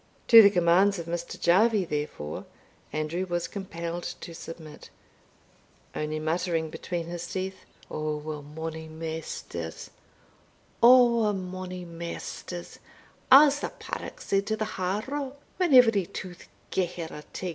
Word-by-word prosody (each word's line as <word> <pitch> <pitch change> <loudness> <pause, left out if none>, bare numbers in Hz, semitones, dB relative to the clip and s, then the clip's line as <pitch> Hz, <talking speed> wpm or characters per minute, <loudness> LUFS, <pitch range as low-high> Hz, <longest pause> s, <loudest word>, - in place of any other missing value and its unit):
To 230 -1 +12
the 200 - +8
commands 185 +2 +4
of 170 - -5
Mr. 170 0 -5
Jarvie, 200 +3 +4
therefore, 145 - -4 0.5
Andrew 155 +5 -2
was 175 -1 -1
compelled 170 -3 -5
to 170 - -8
submit, 160 -2 -10 1.0
only 155 0 -2
muttering 160 0 -1
between 170 0 -4
his 175 0 -5
teeth, 190 0 -5 0.3
"Ower 155 0 -3
mony 160 +2 -6
maisters, 160 - -6 0.9
ower 235 -3 +6
mony 185 -1 -5
maisters, 170 +1 -7 0.5
as 285 +2 +8
the - - -3
paddock - - -7
said 195 0 0
to 220 0 0
the 215 - -1 0.2
harrow, 260 +9 -2 0.2
when 360 -3 +1
every 225 -8 +6
tooth 180 -2 -8 0.2
gae 185 -2 +1
her 170 -1 -6
a 150 - -8
tig." 185 - -4
175 Hz, 125 wpm, -27 LUFS, 160-200 Hz, 1.0 s, To